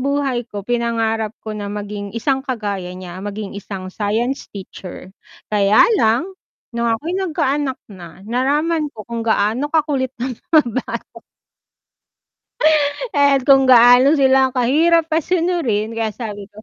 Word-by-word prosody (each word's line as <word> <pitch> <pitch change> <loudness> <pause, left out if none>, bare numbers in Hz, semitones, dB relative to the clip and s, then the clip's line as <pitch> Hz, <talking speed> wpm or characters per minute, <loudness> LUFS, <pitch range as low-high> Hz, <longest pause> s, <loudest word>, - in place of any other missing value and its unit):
buhay 270 -3 -1
ko 205 -2 -7
pinangarap 225 -2 -1
ko 215 - -5
na 205 -1 -5
maging 205 0 -6
isang 265 +3 0
kagaya 205 -9 -4
niya, 185 0 -9
maging 205 0 -6
isang 190 -2 -7
science 225 +6 -2
teacher. 190 -1 -10 0.4
Kaya 205 0 +5 0.2
lang 225 +8 +2 0.5
nung 235 0 -1
ako'y 295 +10 -2
nagkaanak 295 -6 -1 0.2
na, 180 +1 -12
nalaman 295 +7 0
ko 215 -6 -11
kung 235 -1 -5
gaano 225 +5 0
kakulit 290 -4 0 0.2
ang 260 - -3 0.2
mga 315 -2 +6
bata. 255 - -5 1.9
At 280 -2 +3
kung 270 0 +5
gaano 245 +3 +7
sila 265 -3 +4
ang 255 - -14
kahirap 320 +6 +2
pasunurin 325 - 0
kaya 225 -2 -3
sabi 205 -4 -7
ko, 215 +1 -16
235 Hz, 135 wpm, -19 LUFS, 210-280 Hz, 1.9 s, gaano